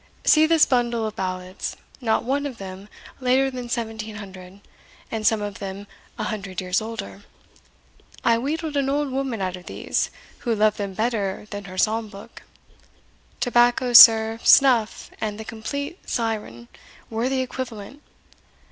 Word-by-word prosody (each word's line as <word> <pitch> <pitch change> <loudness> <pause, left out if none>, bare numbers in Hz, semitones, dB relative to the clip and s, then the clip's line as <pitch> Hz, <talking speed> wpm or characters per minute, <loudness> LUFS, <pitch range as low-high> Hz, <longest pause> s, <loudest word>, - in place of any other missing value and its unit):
See 310 0 +6
this 325 -1 +5
bundle 240 -3 0
of 215 0 -5
ballads, 185 0 -4 0.2
not 225 -3 +1
one 280 +3 -1
of 255 -4 -8
them 195 +1 -9 0.3
later 265 +1 +2
than 250 -1 -6
1700, 215 -5 -6 0.5
and 220 -1 0
some 220 -2 +2
of 205 -1 -6
them 195 0 -6 0.3
an - - -3
hundred 195 -4 -5
years 185 +2 0
older. 220 -3 -7 1.0
I 230 -1 +3
wheedled 305 +4 -3
an 275 -1 +1
old 285 0 0
woman 260 -6 -2
out 185 -1 -2
of 180 - -13
these, - - -2 0.3
who 235 -3 -1
loved 215 0 +2
them 200 -2 -4
better 215 -3 -1
than 205 -1 -6
her 185 -1 -9
psalm 220 +3 +1
book. 205 +3 -12 1.0
Tobacco, 245 0 +2
sir, 225 -1 +9
snuff, 245 -6 +4
and 210 -1 -3
the 220 - -7
Complete 280 - -5
Syren, 215 - -3 0.4
were 230 +3 -1
the 265 -1 0
equivalent! 255 0 -6
225 Hz, 145 wpm, -23 LUFS, 200-255 Hz, 1.0 s, sir